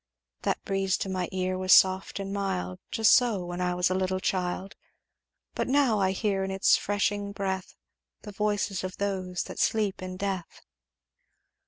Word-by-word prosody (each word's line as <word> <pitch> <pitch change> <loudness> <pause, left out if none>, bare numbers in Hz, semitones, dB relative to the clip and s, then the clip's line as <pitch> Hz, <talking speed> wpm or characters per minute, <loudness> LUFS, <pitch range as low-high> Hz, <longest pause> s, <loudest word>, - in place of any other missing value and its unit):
"'That - - -1
breeze 195 -1 0
to - - -3
my 185 -2 -2
ear 185 0 -1
was 185 0 0
soft 190 +2 +5
and 195 0 -4
mild, 90 - -2
Just 220 -1 +4
so, 225 -8 +3
when 175 +1 -5
I 180 0 0
was 180 +1 +1
a - - +3
little 185 0 0
child; 185 +1 -2 0.8
But - - -2
now 260 -5 +3
I 190 -1 +2
hear 195 0 0
in 190 - -3
its 190 0 +4
freshening 205 0 -1
breath 190 -2 -3 0.5
The 210 - -8
voices 205 -2 -1
of 185 0 -5
those 185 -3 -2
that - - -8
sleep 210 -3 +1
in 185 0 -6
death.' 190 -3 -4
190 Hz, 170 wpm, -28 LUFS, 185-200 Hz, 0.8 s, soft